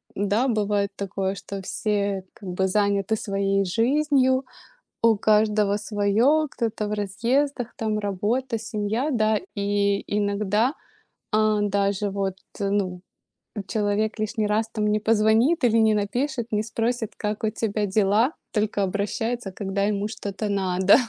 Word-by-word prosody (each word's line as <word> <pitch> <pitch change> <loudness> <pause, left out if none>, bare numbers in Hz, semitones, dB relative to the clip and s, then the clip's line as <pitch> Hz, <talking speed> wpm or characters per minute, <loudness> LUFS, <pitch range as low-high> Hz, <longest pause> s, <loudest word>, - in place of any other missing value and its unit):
да, 205 +6 +1
бывает 205 -3 +1
такое, 195 -1 -2
что 195 +1 -7
все 200 -1 -1
как 195 - -9
бы 190 +1 0
заняты 200 +1 +1
своей 195 -1 0
жизнью, 260 +6 +2 0.6
у 230 -2 +4
каждого 210 -1 +3
своё, 215 +9 +2
кто-то 220 -3 -2
в - - -2
разъездах, 240 +6 -1
там 215 -1 -1
работа, 215 +5 -1
семья, 220 +5 -2
да. 215 -2 +2 0.2
И 200 0 +1
иногда, 210 +4 +1 0.6
а, 215 -1 +2
даже 200 0 0
вот, 195 -1 -2 0.2
ну, 195 -3 -1 0.5
э, - - -3
человек 215 +1 0
лишний 215 0 -1
раз, 220 +2 0
там, 215 -2 -1
не 210 0 +2
позвонит, 225 +8 +3
или 230 -1 +4
не 220 -1 +4
напишет, 240 +4 -1
не 210 0 +1
спросит, 225 +1 -2
как 210 +2 -3
у 220 - +2
тебя 215 -1 -1
дела, 210 +7 +2 0.2
только 210 -2 0
обращается, 205 +3 -2
когда 195 +1 -2
ему 205 0 0
что-то 210 -1 -4
надо. 190 -1 +4
210 Hz, 135 wpm, -24 LUFS, 200-225 Hz, 0.6 s, у